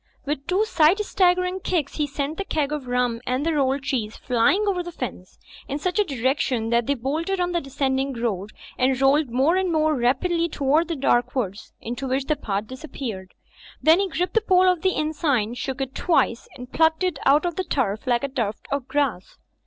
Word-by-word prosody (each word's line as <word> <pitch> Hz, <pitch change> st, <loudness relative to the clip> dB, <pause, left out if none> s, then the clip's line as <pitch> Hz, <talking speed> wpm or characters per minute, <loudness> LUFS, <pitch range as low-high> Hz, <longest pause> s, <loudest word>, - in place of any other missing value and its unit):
With 285 Hz, -1 st, -3 dB
two 380 Hz, +4 st, +2 dB
sight 335 Hz, -3 st, +4 dB
staggering 365 Hz, -2 st, +1 dB
kicks 335 Hz, -6 st, -2 dB
he 300 Hz, -2 st, 0 dB
sent 285 Hz, +2 st, -3 dB
the -, -, 0 dB
keg 300 Hz, -6 st, -1 dB
of 295 Hz, -4 st, -4 dB
rum 245 Hz, -2 st, 0 dB
and 255 Hz, +4 st, 0 dB
the 330 Hz, -, +2 dB
roimd 275 Hz, -2 st, +1 dB
cheese 225 Hz, -6 st, -2 dB
flying 250 Hz, -, +2 dB
over 375 Hz, -3 st, +1 dB
the 350 Hz, 0 st, -7 dB
fence, 240 Hz, -, -7 dB, 0.3 s
in 280 Hz, -, -3 dB
such 360 Hz, +6 st, -1 dB
a -, -, +5 dB
direction 260 Hz, -, -1 dB
that 235 Hz, -1 st, +2 dB
they 280 Hz, -, +2 dB
boimded 315 Hz, +10 st, -2 dB
on 355 Hz, 0 st, 0 dB
the 345 Hz, -1 st, 0 dB
descend 275 Hz, -1 st, -1 dB
ing 270 Hz, 0 st, -2 dB
road 215 Hz, -5 st, -2 dB, 0.3 s
and 255 Hz, 0 st, +2 dB
rolled 275 Hz, +1 st, +3 dB
more 270 Hz, +9 st, +2 dB
and 375 Hz, -2 st, 0 dB
more 310 Hz, -1 st, +2 dB
rapidly 330 Hz, +8 st, +1 dB
down -, -, -10 dB
toward 295 Hz, +4 st, +2 dB
the 335 Hz, -, -2 dB
dark 250 Hz, -3 st, +1 dB
woods 205 Hz, -6 st, -3 dB
into 245 Hz, +4 st, -5 dB
which 265 Hz, +1 st, -1 dB
the 305 Hz, -, +1 dB
path 205 Hz, -7 st, -3 dB
disap 260 Hz, +7 st, -10 dB
peared. 190 Hz, -8 st, -6 dB, 0.4 s
Then 320 Hz, +3 st, +5 dB
he 395 Hz, -1 st, 0 dB
gripped 360 Hz, +2 st, -2 dB
the 450 Hz, -, +3 dB
pole 370 Hz, -3 st, +4 dB
of 360 Hz, -3 st, +2 dB
the 380 Hz, -, +3 dB
inn 305 Hz, +1 st, -1 dB
sign, 255 Hz, -8 st, 0 dB
shook 265 Hz, +2 st, -4 dB
it 270 Hz, -1 st, -3 dB
twice 315 Hz, -9 st, +1 dB
and 250 Hz, +1 st, -10 dB
plucked 320 Hz, +2 st, +3 dB
it 365 Hz, -5 st, -1 dB
out 290 Hz, +4 st, +5 dB
of 345 Hz, -2 st, -2 dB
the 375 Hz, -, -1 dB
turf 225 Hz, -, -2 dB
like 240 Hz, 0 st, +2 dB
a -, -, 0 dB
tuft 230 Hz, -6 st, -3 dB
of 280 Hz, -2 st, -2 dB
grass. 275 Hz, -11 st, -2 dB
280 Hz, 220 wpm, -23 LUFS, 250-335 Hz, 0.4 s, a